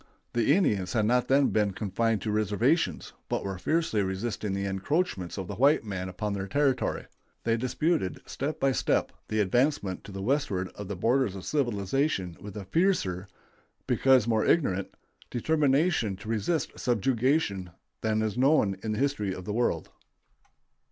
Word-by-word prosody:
The 120 +5 +3
Indians 100 - +1
had 110 -3 +2
not 125 +2 +2
then 140 +1 +4
been 105 -2 +1
confined 110 +2 -1
to 110 - -1
reservations, 110 - +1 0.2
but - - -1
were 95 -2 -4
fiercely 155 - +1
resisting 100 +2 -2
the 100 0 -2
encroachments 100 - -1
of 95 -2 -4
the - - -6
white 140 +2 +4
men 95 -3 -4
upon 105 +3 -3
their 100 -1 -3
territory. 135 0 0 0.4
They 115 0 +2
disputed, 130 - 0
step 145 +3 -4
by 135 - +3
step, - - +1 0.2
the 110 - -1
advancement 105 -1 +1
to 100 - -9
the 95 0 -5
westward 100 -8 0
of 105 - -9
the 100 - -4
borders 115 +2 +1
of 95 - -8
civilization 120 - 0
with 105 0 -8
a 100 - -6
fiercer, 95 - +1 0.6
because 130 -4 +4
more 110 -2 +2
ignorant, 100 - +2 0.4
determination 140 - +2
to 105 +3 -10
resist 115 - -1
subjugation 120 - +1 0.3
than 110 0 +1
is 110 -2 -1
known 130 -8 +3
in 110 -1 -2
the - - -3
history 120 -9 0
of 90 - -8
the 105 - -3
world. 120 +2 0
110 Hz, 160 wpm, -28 LUFS, 100-135 Hz, 0.6 s, then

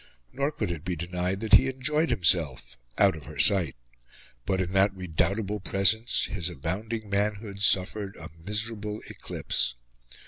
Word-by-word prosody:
Nor 140 +2 -1
could 90 - -3
it 80 -3 -6
be 90 -1 -3
denied 90 +3 -3
that 110 - -2
he 130 - +7
enjoyed 150 +5 0
himself 80 - +2 0.2
out - - +4
of 75 -4 -11
her - - -10
sight; 95 -10 +3 0.7
but, 95 - 0
in 95 0 -2
that 95 +1 +4
redoubtable 95 +4 -1
presence, 100 +4 +2
his 90 -4 -2
abounding 100 - -4
manhood 100 0 -2
suffered 100 +1 +2
a - - -10
miserable 105 +1 -3
eclipse. - - -1
100 Hz, 145 wpm, -27 LUFS, 90-105 Hz, 0.7 s, he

